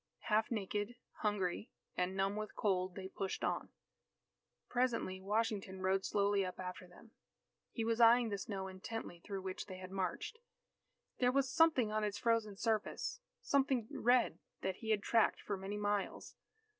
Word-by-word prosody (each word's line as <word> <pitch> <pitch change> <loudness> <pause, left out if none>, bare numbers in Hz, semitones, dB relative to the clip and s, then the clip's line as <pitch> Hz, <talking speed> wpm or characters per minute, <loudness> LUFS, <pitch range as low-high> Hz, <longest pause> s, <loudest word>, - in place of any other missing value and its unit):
Half 220 +1 +4
naked, 210 +1 -2 0.2
hungry, 205 +1 -1 0.3
and 180 +1 0
numb 195 +1 +1
with 215 0 -4
cold, 185 -3 +1
they 190 -1 -5
pushed 190 0 -3
on. - - -1 1.0
Presently 235 -7 0
Washington 200 -2 -1
rode 190 +1 +2
slowly 200 -1 +2
up 185 -1 -5
after 180 0 -6
them. 200 +6 -16 0.6
He 225 - -2
was 230 +1 +1
eying 235 0 +7
the 200 -1 -2
snow 195 -1 -4
intently 190 -1 -6
through 195 +2 -5
which 190 -1 -4
they 185 -2 -7
had 185 0 -8
marched. 195 - -2 0.8
There 250 0 +4
was 265 -1 +1
something 310 -9 +5
on 215 0 0
its 205 -1 -1
frozen 230 -3 +1
surface, 225 - -1 0.2
something 265 -5 +2
red 245 0 +3 0.2
that 190 -1 -1
he 220 - -6
had 215 -2 +2
tracked 230 -2 +3
for 205 - -2
many 195 +2 -4
miles. 205 -1 -1
205 Hz, 155 wpm, -36 LUFS, 190-230 Hz, 1.0 s, eying